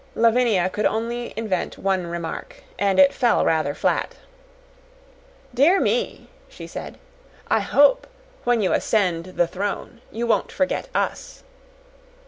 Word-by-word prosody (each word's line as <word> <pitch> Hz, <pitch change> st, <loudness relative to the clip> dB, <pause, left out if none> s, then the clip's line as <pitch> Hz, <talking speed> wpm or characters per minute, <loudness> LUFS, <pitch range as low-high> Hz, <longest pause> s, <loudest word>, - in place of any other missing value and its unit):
Lavinia 230 Hz, -5 st, +3 dB
could 210 Hz, +3 st, 0 dB
only 235 Hz, +2 st, -3 dB
invent 215 Hz, -5 st, -2 dB
one 190 Hz, -2 st, -1 dB
remark, 170 Hz, -, -6 dB, 0.2 s
and 200 Hz, -1 st, +1 dB
it 280 Hz, 0 st, +6 dB
fell 240 Hz, -3 st, +2 dB
rather 155 Hz, -3 st, +1 dB
flat. -, -, -1 dB, 1.4 s
"Dear 305 Hz, +10 st, +4 dB
me," 485 Hz, 0 st, -1 dB, 0.2 s
she -, -, -10 dB
said, -, -, -8 dB, 0.5 s
"I -, -, +4 dB
hope, 290 Hz, -, +3 dB, 0.4 s
when 240 Hz, -3 st, +2 dB
you 185 Hz, -, +1 dB
ascend 180 Hz, -6 st, +1 dB
the 175 Hz, -, +4 dB
throne, 205 Hz, +6 st, -5 dB
you 235 Hz, +2 st, -3 dB
won't 220 Hz, -4 st, +1 dB
forget 280 Hz, -, -1 dB
us!" -, -, -3 dB
225 Hz, 125 wpm, -22 LUFS, 185-245 Hz, 1.4 s, it